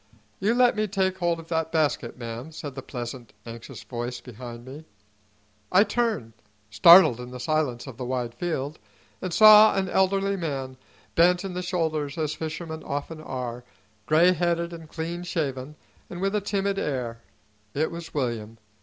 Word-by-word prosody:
"You 215 +4 +1
let 245 -1 +4
me 215 0 0
take 190 -1 0
holt 170 -1 +1
o' - - -7
that 160 -1 -2
basket, 150 -7 0
ma'am," 120 +4 -7
said 145 -3 -7
the 135 - -7
pleasant, 120 -2 -7
anxious 115 -1 -9
voice 120 0 -5
behind 120 0 -10
me. 140 +4 -9 0.9
I 185 +3 +6
turned, 215 - -1 0.4
startled 170 - +8
in 125 0 -7
the 125 0 -8
silence 130 -3 -1
of 130 -5 -10
the 130 - -5
wide 125 -2 -2
field, 155 -3 -3 0.4
and 185 - -3
saw 215 +3 +8
an 195 -1 0
elderly 195 +1 +1
man, 135 -6 -4 0.4
bent 180 +2 +4
in 190 - -5
the 180 - -3
shoulders 160 -5 -2
as 155 -2 -1
fishermen 160 0 -5
often 145 +3 -5
are, 125 -4 -5 0.4
gray 170 +4 +5
headed 170 0 -1
and 165 -2 -10
clean 170 +2 -4
shaven, 150 -5 -3 0.3
and 175 - -7
with 195 +2 0
a 210 - +1
timid 200 0 -1
air. 120 -5 -3 0.5
It 155 +3 0
was 170 -1 -8
William. 115 -5 -3
155 Hz, 165 wpm, -26 LUFS, 125-180 Hz, 0.9 s, startled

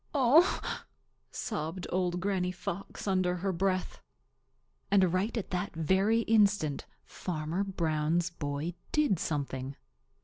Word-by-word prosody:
"Oh!" 285 +7 +5 0.7
sobbed 175 -3 -4
Old 180 -1 0
Granny 185 -1 0
Fox 185 +2 -6
under 185 -2 +2
her 190 +2 -1
breath. 185 +1 -1 0.9
And 190 -3 +4
right 200 +6 0
at 220 - -4
that 180 +1 -2
very 190 +8 +3
instant 205 -10 +2 0.2
Farmer 165 +2 -3
Brown's 170 -2 0
boy 145 +1 -3 0.2
did 295 - +3
something. 135 -4 -3
185 Hz, 110 wpm, -31 LUFS, 165-200 Hz, 0.9 s, Oh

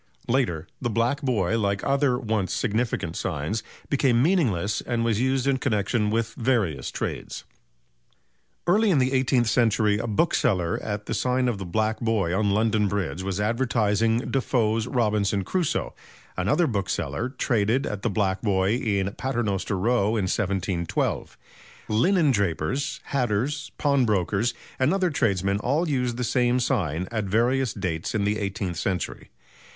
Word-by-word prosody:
Later, 115 - 0 0.2
the 120 - -1
"Black 120 +6 0
Boy," 115 - +1
like 100 -2 0
other 140 -2 +2
once 110 -7 -1
significant 110 -7 -1
signs, 85 +7 -2 0.3
became 130 -4 +2
meaningless 120 - +1
and 115 -1 -1
was 115 -1 +1
used 130 0 +1
in 140 -1 +2
connexion 105 -3 0
with 115 +1 -1
various 110 - 0
trades. - - -5 1.2
Early 210 +5 +3
in 175 - +3
the 130 0 +2
eighteenth 130 -2 +2
century 110 -3 +2
a 120 - -3
bookseller 105 - +1
at 105 -1 -4
the - - -3
sign 125 0 +1
of 115 -5 -1
the 95 - -5
"Black 110 +4 0
Boy" 105 -7 0
on 105 +1 +1
London 105 0 +2
Bridge 95 -5 -2
was 95 0 -3
advertising 115 0 +1
Defoe's 115 -4 +1
"Robinson 105 -5 +1
Crusoe"; 180 - -1 0.4
another 105 - +2
bookseller 115 +1 -2
traded 120 -1 0
at 105 -1 -4
the 120 - 0
"Black 95 -2 0
Boy" 95 -2 +1
in 100 -5 -1
Paternoster 110 -7 -2
Row 110 +1 +2
in 105 - 0
1712. 95 -3 -1 0.5
Linendrapers, 135 - +1
hatters, 135 +4 -1
pawnbrokers 120 - +1 0.2
and 130 +8 +3
other 185 -3 +1
tradesmen 100 - +1
all 145 +10 0
used 125 -5 -1
the 125 - -1
same 120 +1 +2
sign 90 - -1
at 110 -3 -1
various 120 +5 +1
dates 90 +1 -3
in 105 - +1
the 105 +1 0
eighteenth 95 -3 -3
century. 90 0 -3
110 Hz, 145 wpm, -25 LUFS, 100-125 Hz, 1.2 s, Early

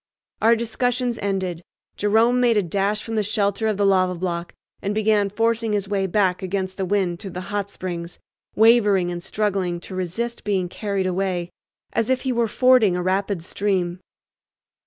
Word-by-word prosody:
Our 230 +1 +5
discussions 240 +1 -1
ended, 190 -4 -2 0.3
Jerome 225 +4 +3
made 240 -3 +3
a 205 - +3
dash 200 +4 -1
from 225 - -6
the 220 - +2
shelter 205 0 0
of 215 -2 0
the 200 - +2
lava 185 -2 +3
block 170 -1 -4 0.3
and 200 +1 -2
began 215 -2 +2
forcing 225 +1 0
his 200 -1 -1
way 195 -1 0
back 190 -1 +1
against 190 0 -3
the 190 - -1
wind 185 -3 0
to 200 - -5
the 180 - -6
"Hot 200 -1 -1
Springs," 175 -3 -6 0.4
wavering 210 -5 +4
and 175 0 -5
struggling 190 -2 -1
to 190 - -9
resist 185 +6 -3
being 190 -4 0
carried 200 -1 -2
away, 180 -1 -1 0.4
as 225 +1 0
if 260 -1 +1
he 260 - -1
were 235 -1 +1
fording 250 -5 +4
a 180 - -2
rapid 190 -1 0
stream. 185 -2 -1
200 Hz, 175 wpm, -22 LUFS, 185-220 Hz, 0.4 s, Our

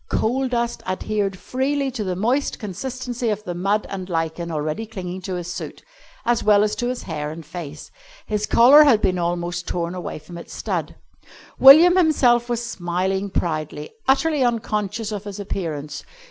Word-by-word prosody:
Coal 260 +4 0
dust 235 -1 -2
adhered 195 +1 -2
freely 270 +5 -1
to 240 -4 -4
the 185 -2 -2
moist 245 +9 0
consistency 245 +3 -4
of 210 0 -2
the 180 - -4
mud 195 +4 0
and 190 -1 -6
lichen 165 0 -2
already 155 +7 -3
clinging 185 -3 -6
to 185 0 -4
his 175 0 -5
suit, - - -7 0.4
as 240 -1 +1
well 210 -1 +5
as 210 0 0
to 240 - -1
his 250 0 -3
hair 150 -3 -4
and 160 +1 -8
face. 155 -2 -8 0.3
His 210 -1 -2
collar 260 +6 +7
had 260 -8 +5
been 185 -3 +1
almost 175 0 -2
torn 170 0 -2
away 180 -2 -5
from 170 +3 -10
its - - -10
stud. - - -3 0.6
William 325 +7 +9
himself 250 -8 +3
was 240 0 -1
smiling 190 -1 -2
proudly, 155 -4 -3 0.2
utterly 280 +1 +3
unconscious 220 -2 -1
of 205 -1 -5
his 205 0 -7
appearance. 155 -7 -4
200 Hz, 170 wpm, -22 LUFS, 175-240 Hz, 0.6 s, William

